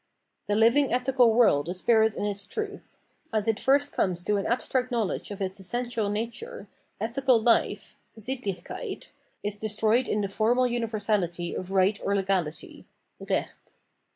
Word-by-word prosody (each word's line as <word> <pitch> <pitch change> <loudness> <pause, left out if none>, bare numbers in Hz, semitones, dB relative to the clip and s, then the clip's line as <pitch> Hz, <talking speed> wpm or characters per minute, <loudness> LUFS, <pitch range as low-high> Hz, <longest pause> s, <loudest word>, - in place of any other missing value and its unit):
The 205 - +1
living 235 +6 +4
ethical 250 -1 +3
world 220 -10 +4
is 180 - -2
spirit 220 +1 +3
in - - -2
its 200 -1 -2
truth. 405 - -6 0.3
As 215 -1 0
it 220 -2 +1
first 285 +2 +2
comes 175 -2 0
to 205 +2 +1
an 195 - -2
abstract 250 +1 0
knowledge 225 -5 -1
of 200 -1 -4
its 190 +1 -4
essential 235 +2 -2
nature, 225 0 -5 0.3
ethical 245 +3 +2
hfe 235 - +2 0.2
(Sittlichkeit) 220 -4 -5 0.3
is 205 0 -2
destroyed 220 +3 +1
in 210 - 0
the 200 - -1
formal 230 +5 +2
universality 210 -7 -1
of 185 - -5
right 195 +1 +2
or 200 - +1
legality 190 -5 -2 0.3
(Recht). - - -4
215 Hz, 150 wpm, -27 LUFS, 195-240 Hz, 0.3 s, living